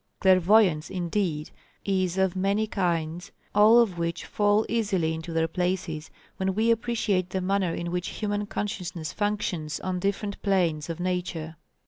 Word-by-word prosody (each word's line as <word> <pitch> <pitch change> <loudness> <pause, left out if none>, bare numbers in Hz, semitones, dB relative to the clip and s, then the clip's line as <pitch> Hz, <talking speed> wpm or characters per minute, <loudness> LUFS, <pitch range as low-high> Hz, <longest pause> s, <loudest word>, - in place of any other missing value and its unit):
Clairvoyance, 185 -3 +4
indeed, 175 -4 -2 0.3
is 185 -2 0
of 190 -1 +2
many 200 +3 +1
kinds, 175 -4 -2 0.2
all 210 +3 +7
of 210 -8 +3
which 170 0 -2
fall 205 +1 +2
easily 195 -8 0
into 160 +1 -6
their 165 0 +1
places 175 -3 -2 0.3
when 190 0 -1
we 225 +2 +3
appreciate 220 -5 0
the 190 - -2
manner 185 -2 0
in 170 0 -4
which 180 0 -2
human 205 -1 -2
consciousness 180 -6 -4
functions 205 -7 -2
on 185 -1 -2
different 200 +2 -2
planes 175 -6 +1
of 165 0 -4
Nature. 175 -3 -3
185 Hz, 145 wpm, -26 LUFS, 170-205 Hz, 0.3 s, all